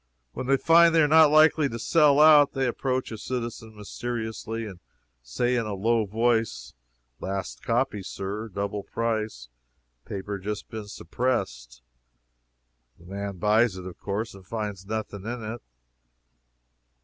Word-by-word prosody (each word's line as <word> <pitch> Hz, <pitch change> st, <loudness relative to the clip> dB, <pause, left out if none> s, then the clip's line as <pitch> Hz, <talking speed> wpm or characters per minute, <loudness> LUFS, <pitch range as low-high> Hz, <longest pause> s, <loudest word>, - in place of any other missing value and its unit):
When 130 Hz, -, -5 dB
they 135 Hz, 0 st, +4 dB
find 165 Hz, +2 st, +5 dB
they 165 Hz, -, +6 dB
are -, -, +4 dB
not 155 Hz, 0 st, +7 dB
likely 155 Hz, -1 st, +5 dB
to 115 Hz, -, -5 dB
sell 145 Hz, +4 st, +4 dB
out, 150 Hz, -2 st, +7 dB
they 135 Hz, -1 st, 0 dB
approach 130 Hz, +1 st, -2 dB
a 110 Hz, -, -6 dB
citizen 115 Hz, -2 st, -5 dB
mysteriously, 115 Hz, +1 st, -5 dB
and 95 Hz, -4 st, -9 dB, 0.4 s
say 120 Hz, -, -1 dB
in 115 Hz, -3 st, -1 dB
a 105 Hz, -, -3 dB
low 110 Hz, +2 st, +1 dB
voice 110 Hz, -, 0 dB, 0.5 s
"Last 95 Hz, 0 st, -5 dB
copy, 120 Hz, -3 st, 0 dB
sir: 100 Hz, +3 st, -5 dB
double 100 Hz, +1 st, -3 dB
price; 110 Hz, -, -3 dB, 0.6 s
paper 100 Hz, 0 st, -5 dB
just 105 Hz, +1 st, -5 dB
been 110 Hz, -2 st, -6 dB
suppressed!" 65 Hz, -, -3 dB, 1.1 s
The 85 Hz, -, -19 dB
man 100 Hz, +1 st, -5 dB
buys 105 Hz, +2 st, +2 dB
it, 90 Hz, -, -8 dB
of 90 Hz, -2 st, -9 dB
course, 110 Hz, +4 st, -3 dB
and 95 Hz, -, -13 dB
finds 100 Hz, -1 st, -5 dB
nothing 105 Hz, -2 st, -4 dB
in 115 Hz, +1 st, -5 dB
it. 110 Hz, +2 st, -6 dB
110 Hz, 145 wpm, -26 LUFS, 100-120 Hz, 1.1 s, not